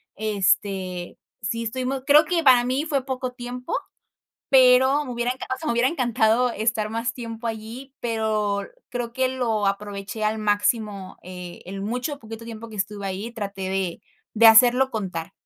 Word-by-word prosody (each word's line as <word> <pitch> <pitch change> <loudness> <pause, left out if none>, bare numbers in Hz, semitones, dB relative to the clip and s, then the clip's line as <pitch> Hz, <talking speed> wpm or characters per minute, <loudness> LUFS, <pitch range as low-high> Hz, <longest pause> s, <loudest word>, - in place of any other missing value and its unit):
Este, 195 -3 -1 0.2
sí 230 +4 -2
estuvimos 260 +3 -2
creo 300 +2 +7
que 335 +1 0
para 255 -4 +7
mí 265 +5 0
fue 275 -4 -1
poco 255 -2 -3
tiempo, 250 0 -5 0.8
pero 260 +2 +6
me 255 - -6
hubiera 240 +1 -1
encan 260 - -8
o - - -11
sea, 320 - -7
me 235 - +1
hubiera 240 +2 +3
encantado 240 -4 +2
estar 220 -1 -1
más 230 +2 -2
tiempo 230 -1 -7
allí, 230 +5 -7
pero 215 -3 0 0.3
creo 240 -1 -4
que 260 +1 +1
lo 235 -5 0
aproveché 200 +2 -3
al 215 +1 0
máximo, 205 -1 0
eh, 180 -1 -9
el 195 +1 -6
mucho 245 +7 -2
o - - -16
poquito 225 -1 -9
tiempo 225 0 -8
que 215 - -9
estuve 200 0 -3
ahí, 195 +5 -4
traté 200 -4 -5
de 190 -2 -2 0.3
de 230 +1 +6
hacerlo 245 +4 +7
contar. 185 -8 -4
225 Hz, 170 wpm, -24 LUFS, 205-250 Hz, 0.8 s, creo